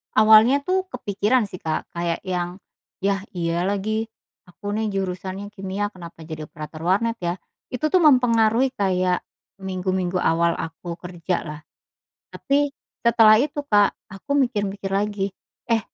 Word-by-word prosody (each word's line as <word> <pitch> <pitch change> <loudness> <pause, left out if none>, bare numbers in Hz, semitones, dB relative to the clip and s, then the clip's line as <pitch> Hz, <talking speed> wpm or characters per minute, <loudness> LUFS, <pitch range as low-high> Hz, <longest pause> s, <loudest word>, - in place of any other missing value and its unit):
Awalnya 220 +5 +7
tuh 370 +6 0
kepikiran 215 0 0
sih 185 - -9
Kak 160 -3 -3
kayak 170 -1 -1
yang, 180 0 -2 0.4
ya 195 0 0
iya 170 -1 -1
lagi, 215 +3 -1 0.3
aku 205 +3 -6
nih 220 -1 -1
jurusannya 190 +1 -4
kimia 195 +1 -2
kenapa 175 -5 -12
jadi 155 -1 -6
operator 155 0 -8
warnet 210 +6 +2
ya? 175 0 0 0.4
Itu 255 +4 0
tuh 365 +1 +3
mempengaruhi 245 -2 +4
kayak, 185 -2 +1 0.4
minggu-minggu 185 -1 -1
awal 170 0 +2
aku 165 +1 -6
kerja 180 0 -3
lah, 150 -1 -7 0.7
tapi 285 +1 +1 0.3
setelah 225 -2 +6
itu 295 0 -3
Kak 205 -5 +4 0.2
aku 280 +9 -3
mikir-mikir 205 -6 -1
lagi, 200 -1 -1 0.3
"Eh, 230 -1 +2
195 Hz, 135 wpm, -23 LUFS, 180-225 Hz, 0.7 s, Awalnya